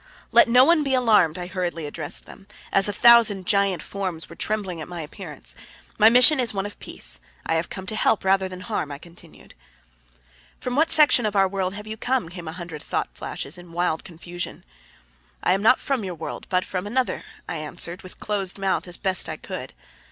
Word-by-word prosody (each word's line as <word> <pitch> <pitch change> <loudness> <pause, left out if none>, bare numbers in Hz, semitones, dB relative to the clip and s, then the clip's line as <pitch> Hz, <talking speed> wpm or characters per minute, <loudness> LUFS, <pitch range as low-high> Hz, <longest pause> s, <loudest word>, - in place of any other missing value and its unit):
"Let - - +7
no 250 +2 +7
one 335 0 +4
be 270 -2 +1
alarmed," 210 -10 +3
I 180 - -5
hurriedly 175 -3 -3
addressed 145 0 -3
them, 195 - -14 0.3
as 195 +1 +4
a - - +2
thousand 220 -3 +5
giant 200 -2 +1
forms 185 -5 -4
were - - -12
trembling 195 -6 -2
at - - -7
my 175 -1 -6
appearance. - - -9 0.5
"My 215 +1 +8
mission 250 +5 +7
is 235 -4 +1
one 195 0 -1
of 205 - -8
peace. 65 - +2 0.3
I - - 0
have 165 +1 -1
come 190 - -7
to 215 - -4
help 215 -2 +1
rather 190 0 +2
than 185 0 -8
harm," 150 -5 -3
I 140 - -5
continued. 170 +1 -16 1.1
"From 250 0 -3
what 315 +3 +3
section 295 -8 +5
of 210 - -4
our 195 -1 +4
world 190 0 -3
have 210 +1 -8
you 220 0 -7
come?" 250 -6 -1
came 175 -2 -9
a - - -4
hundred 170 -4 -8
thought - - -2
flashes 145 - -6
in 175 -1 -14
wild 175 -2 -1
confusion. 175 0 -7 0.8
"I - - +3
am 195 - 0
not 230 +4 +5
from 270 -5 -2
your 185 -2 -5
world, - - -7
but 185 -1 +1
from 185 +1 -4
another," 250 +4 -1 0.2
I 165 - -4
answered 170 +3 -4
with 185 - -13
closed 200 -3 -2
mouth 195 -1 -1
as 175 - -2
best 190 -3 0
I - - -5
could. - - -8
190 Hz, 210 wpm, -23 LUFS, 175-215 Hz, 1.1 s, My